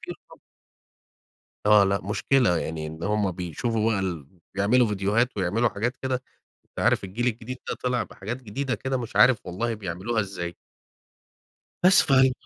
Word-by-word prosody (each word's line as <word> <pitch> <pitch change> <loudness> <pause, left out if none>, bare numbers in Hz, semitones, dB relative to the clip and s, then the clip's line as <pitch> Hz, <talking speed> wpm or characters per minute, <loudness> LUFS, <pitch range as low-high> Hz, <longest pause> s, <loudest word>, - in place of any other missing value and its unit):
في - - -9
رقابة. - - -12 1.3
آه، 105 -1 +7
لا 100 0 +1
مشكلة، 105 -1 +2
يعني 80 -1 -4
إن 80 +1 -9
هم 105 -1 +1
بيشوفوا 110 +6 -1
بقى 100 - +1
ال 85 -7 -3 0.3
بيعملوا 115 +6 +3
ڤيديوهات 105 +4 +1
ويعملوا 105 +5 +1
حاجات 120 +5 -2
كده 130 -1 -1 0.5
أنت - - -17
عارف - - +2
الجيل 115 +6 -3
الجديد 120 +2 -3
ده - - -1
طلع 125 -2 +1
بحاجات 120 +7 -7
جديدة 130 +4 -3
كده 130 +5 -2
مش 120 0 -6
عارف 125 -4 +6
والله 115 +6 -2
بيعملوها 100 +3 -2
ازاي. 85 -4 -5 1.3
بس 190 +1 +7
فهي 130 -2 +4
105 Hz, 155 wpm, -25 LUFS, 95-125 Hz, 1.3 s, آه